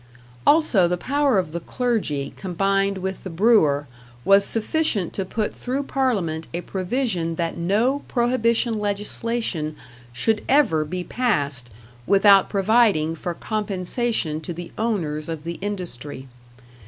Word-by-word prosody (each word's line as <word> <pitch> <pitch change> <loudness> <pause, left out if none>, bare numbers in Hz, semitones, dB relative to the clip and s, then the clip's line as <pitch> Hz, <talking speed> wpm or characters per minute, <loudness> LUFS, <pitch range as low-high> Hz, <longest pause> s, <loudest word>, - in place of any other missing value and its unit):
Also 290 - +5
the 180 +1 -1
power 280 +3 +1
of 180 -5 -1
the 170 - -3
clergy, 185 - -2
combined 195 +1 0
with 190 0 -4
the 190 - -5
brewer, 165 -7 +3 0.4
was 195 0 +6
sufficient 225 - 0
to 195 - -2
put 210 +3 -2
through 265 +3 -3
Parliament 200 - -1
a 175 - -2
provision 185 -3 -2
that 165 0 -2
no 215 +11 +1
prohibition 235 -2 +1
legislation 205 -5 -2 0.4
should 215 - 0
ever 245 - +4
be 180 +4 -4
passed 145 - -1 0.4
without 195 0 +6
providing 200 -6 +3
for 170 +1 -4
compensation 205 - -2
to 170 +2 -5
the 175 +1 -8
owners 165 -9 -2
of 160 -2 -5
the 170 +1 -5
industry. 150 -10 -5
195 Hz, 130 wpm, -23 LUFS, 165-230 Hz, 0.4 s, was